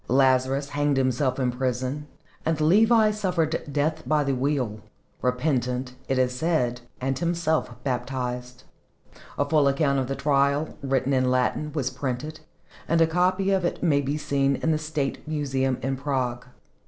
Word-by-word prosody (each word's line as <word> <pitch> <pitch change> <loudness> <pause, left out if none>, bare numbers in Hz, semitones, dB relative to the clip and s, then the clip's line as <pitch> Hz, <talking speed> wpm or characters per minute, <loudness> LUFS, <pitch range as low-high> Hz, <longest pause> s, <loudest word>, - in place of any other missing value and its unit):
Lazarus 130 +2 +2
hanged 145 -1 +1
himself 130 0 +1
in 130 -2 +1
prison, 130 +3 -2 0.4
and 160 -1 0
Levi 215 +7 +5
suffered 180 -6 0
death 155 +3 0
by 155 -1 +3
the 140 -1 0
wheel 130 -5 -1 0.4
repentant, 125 -1 0
it 135 - 0
is 125 -1 +2
said, 125 -5 0 0.2
and 135 +1 -1
himself 165 -6 0
baptized. 125 -1 -3 0.7
A 145 - +2
full 150 -2 +3
account 140 0 +2
of 130 - -1
the 135 - -2
trial, 140 +1 +1
written 135 0 0
in 130 -1 +2
Latin, 130 +4 0
was 135 -4 -1
printed, 140 +4 -4 0.5
and 165 +1 +2
a 165 - +6
copy 185 +4 +1
of 190 -2 +2
it 175 - -2
may 145 -5 +3
be 140 +2 -2
seen 140 -2 +1
in 160 - 0
the 155 - +1
State 150 -2 -3
Museum 135 -4 0
in 135 +1 0
Prague. 125 -3 -2
140 Hz, 155 wpm, -25 LUFS, 130-155 Hz, 0.7 s, a